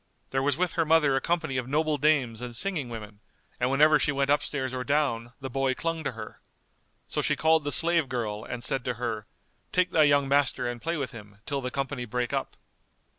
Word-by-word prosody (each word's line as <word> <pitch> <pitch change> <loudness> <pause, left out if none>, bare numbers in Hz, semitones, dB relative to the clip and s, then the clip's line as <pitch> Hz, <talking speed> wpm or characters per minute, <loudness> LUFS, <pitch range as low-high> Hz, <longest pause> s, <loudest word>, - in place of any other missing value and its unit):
There 135 - +1
was 140 0 +1
with 180 -1 0
her 165 - +2
mother 155 -3 +4
a 135 - +1
company 160 -5 -1
of 125 -1 -2
noble 155 +1 +1
dames 130 -6 +2
and 120 -1 -5
singing 160 -4 -1
women, 105 -3 -8 0.4
and 125 - +1
whenever 150 +3 +5
she 150 - +2
went 140 0 +1
upstairs 145 -3 0
or 130 -1 -2
down, 125 -5 0
the 135 - -5
boy 135 0 0
clung 165 +1 -2
to 140 - -2
her. 110 -1 -9 0.7
So - - -1
she - - +1
called 160 -1 +3
the 145 - -2
slave 165 -3 +2
girl 110 -4 -3
and 120 +1 -6
said 130 0 0
to 125 - -1
her, 110 -3 -4 0.4
"Take 180 0 +2
thy 155 -2 +5
young 145 -1 +3
master 140 -2 +2
and 120 -1 -5
play 165 0 -2
with 140 -3 -3
him, 105 -4 -12
till 140 -1 -2
the 125 - -3
company 135 -1 -3
break 120 +1 -2
up." - - -3
135 Hz, 220 wpm, -27 LUFS, 120-150 Hz, 0.7 s, whenever